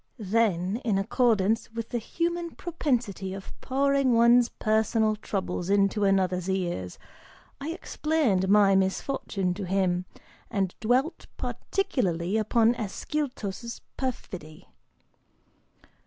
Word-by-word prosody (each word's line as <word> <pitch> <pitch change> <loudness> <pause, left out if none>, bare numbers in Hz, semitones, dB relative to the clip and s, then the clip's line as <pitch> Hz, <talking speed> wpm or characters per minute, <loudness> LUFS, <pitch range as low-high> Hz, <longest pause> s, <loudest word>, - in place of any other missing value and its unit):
Then, 205 -3 +1
in 225 -5 0
accordance 220 0 +1
with 230 0 -5
the 240 - -1
human 340 +6 -2
propensity 240 - -2
of 195 - -9
pouring 275 -1 +2
one's 235 +1 +5
personal 220 0 +1
troubles 190 -4 -3
into 200 +1 +3
another's 185 -2 +1
ears, 175 - -2 0.6
I 285 +3 -4
explained 300 - 0
my 200 -1 +6
misfortune 190 -1 0
to 200 +2 -5
him, 180 -1 +1 0.4
and 195 -2 -1
dwelt 260 +9 0
particularly 200 - -1
upon 225 +2 +3
Ascyltos' 235 -1 -4 0.2
perfidy.) 185 - -6
215 Hz, 100 wpm, -27 LUFS, 190-250 Hz, 0.6 s, my